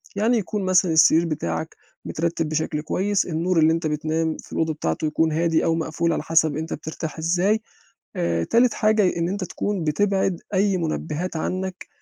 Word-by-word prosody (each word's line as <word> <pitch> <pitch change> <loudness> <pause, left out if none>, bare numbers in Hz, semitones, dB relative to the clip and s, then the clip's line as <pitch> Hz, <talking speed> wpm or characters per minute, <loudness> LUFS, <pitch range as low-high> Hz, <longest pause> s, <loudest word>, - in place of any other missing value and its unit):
يعني 225 +4 +2
يكون 205 0 -2
مثلًا 185 -1 +3
السرير 160 +1 +5
بتاعك 85 - -3 0.3
مترتب 165 -1 -2
بشكل 155 -1 -1
كويس، 195 +5 0
النور 170 +1 0
اللي 160 +1 +5
أنت 165 -1 -1
بتنام 155 +1 -1
في - - -13
الأوضة 160 -1 0
بتاعته 115 - -2
يكون 160 +1 +1
هادي 165 +1 +1
أو 165 -1 +2
مقفول 165 +1 -1
على - - -2
حَسب 160 -2 +2
أنت 160 +1 -4
بترتاح 160 +1 -6
إزاي 180 +7 +1 0.5
آآ، 85 -1 0
تالت 235 - +3
حاجة 215 0 +2
ي 180 - +1
إن 170 0 0
أنت 200 +1 -3
تكون 190 +1 -3
بتبعد 190 +3 0
أي 195 0 +2
منبهات 165 +1 -3
عنّك 185 +2 -4
165 Hz, 175 wpm, -23 LUFS, 155-185 Hz, 0.5 s, السرير